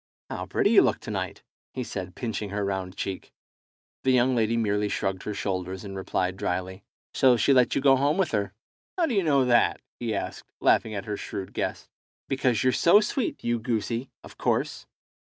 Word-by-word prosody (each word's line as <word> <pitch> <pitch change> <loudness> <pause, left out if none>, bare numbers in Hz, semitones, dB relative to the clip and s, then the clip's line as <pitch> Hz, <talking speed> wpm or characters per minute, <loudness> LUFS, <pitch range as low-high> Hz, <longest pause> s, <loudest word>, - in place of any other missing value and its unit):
"How - - -4
pretty - - +2
you - - +8
look - - +2
to - - -6
night!" - - -4 0.3
he 130 - -2
said, 95 -5 -6
pinching 110 -4 -3
her 100 0 -2
round 95 -1 -3
cheek. 95 -1 -5 0.7
The 130 - +2
young 130 0 +4
lady 115 0 +1
merely 105 -2 +1
shrugged 95 -2 -2
her 105 - -4
shoulders, 95 -1 -3
and 100 -1 -7
replied 95 -1 -2
dryly 95 +1 -3 0.3
"So 130 -2 +5
she 140 - +4
let 125 -2 +4
you - - +1
go 135 -1 +6
home 145 +5 +2
with 190 -2 +1
her." 100 -3 -1 0.5
"How 350 - +3
do 270 - -2
you 200 - +3
know 140 -6 +3
that?" 120 -1 +3 0.2
he 115 -3 -2
asked, - - -5
laughing 110 -1 +3
at 100 - -4
her 105 -1 -3
shrewd 95 -1 -6
guess. - - -3 0.4
"Because 130 -5 +1
you're 130 0 +3
so 170 +10 +6
sweet, 220 +3 -2
you 120 0 0
goosey, 115 +2 -2
of - - -14
course." - - -1
110 Hz, 195 wpm, -26 LUFS, 100-130 Hz, 0.7 s, you